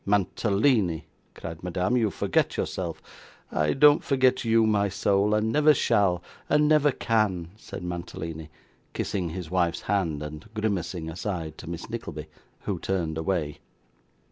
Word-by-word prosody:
'Mantalini,' 100 - +2 0.3
cried 80 -1 -7
Madame, 90 +6 0
'you 115 -4 +3
forget - - 0
yourself.' - - -3 0.5
'I 75 -1 +1
don't 145 +1 +6
forget 130 -2 +2
you, 115 -1 +4
my 100 -2 +2
soul, 100 +2 +2
and 110 +1 +1
never 150 +2 +5
shall, 90 -7 +2 0.3
and 150 0 +4
never 150 -1 +4
can,' 100 -9 0
said 105 - -9
Mantalini, 80 -2 -5 0.4
kissing 90 -4 -2
his 85 0 -6
wife's 85 -2 +1
hand, 85 -7 -1
and 75 +6 -8
grimacing 95 -6 -2
aside, 80 -2 -4
to 80 - -8
Miss 85 0 -6
Nickleby, 85 -10 -6 0.4
who - - -3
turned 85 -5 -1
away. 80 -2 -2
95 Hz, 140 wpm, -26 LUFS, 85-110 Hz, 0.5 s, don't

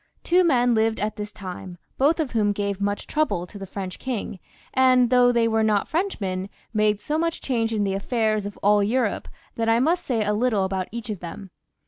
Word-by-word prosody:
Two 360 +1 +4
men 245 -7 +3
lived 220 0 +1
at 215 +1 -2
that 210 0 -6
time, 185 -1 -8 0.2
both 300 +5 +3
of 300 -5 -1
whom 210 -3 +2
gave 200 -1 -3
much 205 0 -1
trouble 300 - 0
to 200 +3 -11
the 195 - -7
French 190 -1 -6
king, 230 -6 -4 0.3
and, 255 -2 +4
though 245 -1 +5
they 235 -1 +2
were 225 0 +1
not 215 -2 +2
Frenchmen, 200 - -2 0.2
made 210 -1 +2
so 300 +8 -2
much 330 0 -1
change 230 -4 -1
in 215 -2 0
the 195 -1 0
affairs 215 0 0
of 205 - -9
all 205 +1 +5
Europe, 225 +1 0 0.3
that 225 0 0
I 225 +1 +4
must 325 +7 +2
say 225 -5 0
a 210 - +1
little 215 -2 +1
about 190 -1 -2
each 235 0 -5
of 205 - -5
them. 180 +3 -8
220 Hz, 210 wpm, -24 LUFS, 200-250 Hz, 0.3 s, though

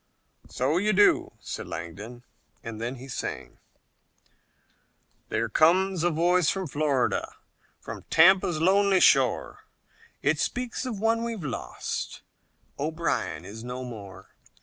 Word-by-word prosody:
"So 135 +6 0
you 210 +3 +2
do," 205 +2 +4
said - - -6
Langdon, 105 +9 -7 0.4
and 115 -1 -7
then 120 +3 -3
he 130 +1 -10
sang: 135 - -6 1.7
"There - - 0
comes 185 +3 +3
a 175 - +3
voice 175 +1 +2
from 190 -1 -1
Florida, 145 -4 0 0.4
From - - -9
Tampa's 175 -1 +5
lonely 195 +3 +4
shore, - - +3 0.6
It - - +2
speaks 250 +1 -2
of 225 -6 -4
one 225 +2 +1
we've 230 -6 -4
lost, 115 - -5 0.6
O'Brien 155 - -2
is 110 +4 -9
no 125 +1 -5
more. 105 -6 -10
160 Hz, 120 wpm, -27 LUFS, 125-190 Hz, 1.7 s, Tampa's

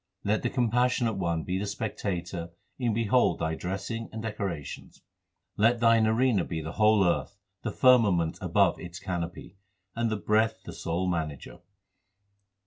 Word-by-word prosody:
Let 105 +1 +1
the - - 0
Compassionate 120 -2 +1
One 85 -3 -1
be 95 +1 -2
the 105 - -3
spectator 90 -5 -4 0.3
and 120 -3 +1
behold 115 +2 +2
thy 80 0 -1
dressing 95 +7 -4
and 110 - -6
decorations. 100 -9 -5 0.5
Let 115 +3 +3
thine 115 -1 +4
arena 110 -3 +2
be 85 -2 -4
the 80 +1 -5
whole 105 0 +4
earth, 90 +3 0 0.2
the 110 - -3
firmament 105 -9 +3
above - - +2
its 85 0 -8
canopy, 90 0 -5 0.4
And 115 0 0
the 110 - -1
breath 110 +2 +1
the - - -8
sole 85 +3 -2
manager. 80 -6 -4
100 Hz, 145 wpm, -28 LUFS, 85-115 Hz, 0.5 s, thine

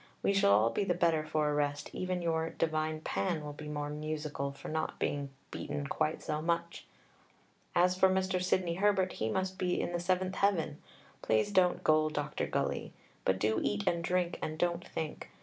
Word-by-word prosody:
We 200 - +3
shall 195 - +4
all 110 +3 +4
be - - 0
the 180 -3 +1
better 165 -3 +2
for 155 -1 0
a - - 0
rest. 145 0 -1
Even 185 -1 -2
your 165 -1 0
'divine 155 -1 -1
Pan' 165 -2 -1
will 145 - -5
be 150 +1 -8
more 145 0 -3
musical 150 -2 -3
for 140 - -10
not 160 0 -2
being 140 -1 -1 0.2
beaten 145 -1 -4
quite 155 +2 -1
so 150 0 -2
much. 170 +1 -2 0.9
As 180 +1 +4
for 190 +1 +5
Mr. 185 -1 +1
Sidney 180 -2 +1
Herbert, 190 0 +2
he 110 - -2
must 190 +7 -2
be 180 -1 +1
in - - -1
the 175 - -1
seventh 185 +1 0
heaven. 165 -7 +1 0.4
Please 110 - +2
don't 185 -3 +3
gull 155 0 +4
Dr. 150 -1 -2
Gully, - - -2 0.3
but 95 - +3
do 110 +3 +1
eat 105 0 -1
and 170 0 +1
drink 180 0 0
and 155 0 -3
don't 175 +1 0
think. 155 -2 -5
160 Hz, 190 wpm, -32 LUFS, 150-180 Hz, 0.9 s, for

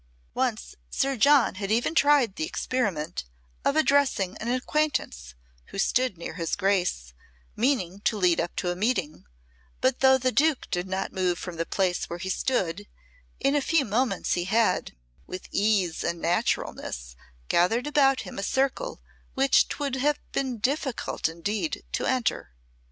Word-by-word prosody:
Once - - -2
Sir 275 - 0
John 275 +2 +5
had 195 - -2
even 235 +8 +1
tried 285 - +4
the - - -3
experiment 175 - -2 0.4
of 280 - +2
addressing 275 -11 +2
an 225 - -6
acquaintance 250 - -1 0.3
who - - -10
stood 250 0 +1
near 170 - -6
his 165 -3 -2
Grace, 180 - 0 0.4
meaning 210 -7 0
to 215 +1 0
lead 180 -4 +3
up 175 - -5
to 180 - -1
a - - -3
meeting, 185 -7 -1 0.5
but 260 -1 +1
though 265 0 +6
the 255 0 0
Duke 300 +1 +2
did 180 +1 -1
not 190 +1 -3
move 180 -2 0
from 180 -2 -7
the 165 - -2
place 185 -2 0
where 170 - -4
he 185 +2 -3
stood, 200 -5 -1 0.5
in 275 +1 +2
a 290 - +3
few 310 0 +2
moments 220 -2 0
he 175 -1 -1
had, 225 +4 +1 0.3
with 185 - -7
ease 200 -5 +1
and 170 0 -2
naturalness, 60 - -2 0.3
gathered 225 +9 +2
about 275 -3 +3
him - - -8
a - - -2
circle 270 - -1 0.3
which 270 0 +4
'twould 280 -3 -3
have 290 +3 +2
been 260 -3 -2
difficult 265 - -1
indeed 205 - -3
to - - -1
enter. 240 - -1
210 Hz, 155 wpm, -26 LUFS, 175-265 Hz, 0.5 s, though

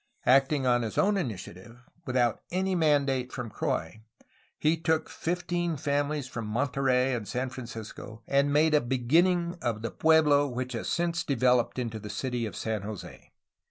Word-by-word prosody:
Acting 135 +1 +4
on 120 -1 +3
his 115 -2 -4
own 205 +1 +3
initiative, 115 - -5 0.3
without 125 -3 +1
any 190 +2 0
mandate 140 -6 +2
from 125 -4 -6
Croix, 105 +4 -3 0.6
he 155 +2 +2
took 160 -1 0
fifteen 175 -1 -2
families 145 0 -1
from 115 -4 -5
Monterey 130 +2 +1
and 115 -4 -3
San 125 +5 -2
Francisco, 115 -2 -8
and 140 +1 +2
made 155 +2 +3
a 150 - +5
beginning 170 +8 +2
of 115 -2 -2
the 115 - -3
pueblo 150 -3 +4
which 125 0 -4
has 115 - -3
since 170 -1 0
developed 125 -4 +2
into 115 -3 -3
the 105 0 -8
city 120 +2 -2
of 105 - -8
San 110 -2 -2
Jose. 105 -1 -9
130 Hz, 160 wpm, -28 LUFS, 120-155 Hz, 0.6 s, a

